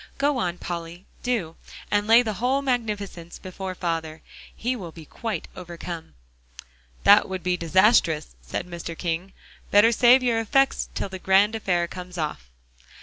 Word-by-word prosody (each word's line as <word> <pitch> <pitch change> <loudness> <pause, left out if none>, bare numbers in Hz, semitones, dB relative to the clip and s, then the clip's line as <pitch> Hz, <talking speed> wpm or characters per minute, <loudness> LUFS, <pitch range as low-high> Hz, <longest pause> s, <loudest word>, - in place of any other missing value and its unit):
"Go 280 -1 +1
on, 175 -4 -1
Polly, 170 +1 -6 0.2
do, 215 -10 -2 0.3
and 205 0 +1
lay 230 +2 +7
the 220 -2 -2
whole 265 +3 +1
magnificence 210 -9 -3
before 185 0 -6
father. 165 -2 -3 0.3
He 250 +3 -2
will 180 -8 -7
be 160 -1 -12
quite 215 +1 -5
overcome." 170 - -8 0.9
"That - - +6
would 185 -1 -4
be 180 0 +1
disastrous," 170 - +3
said - - -4
Mr. 170 -1 -7
King; 175 +2 -3 0.4
"better 205 +3 +6
save 245 +3 +5
your 235 -2 +2
effects 270 +4 +1
till - - -3
the 190 0 -7
grand 195 +3 +4
affair 180 -6 0
comes 180 0 -9
off." 150 - -4
185 Hz, 150 wpm, -24 LUFS, 170-225 Hz, 0.9 s, lay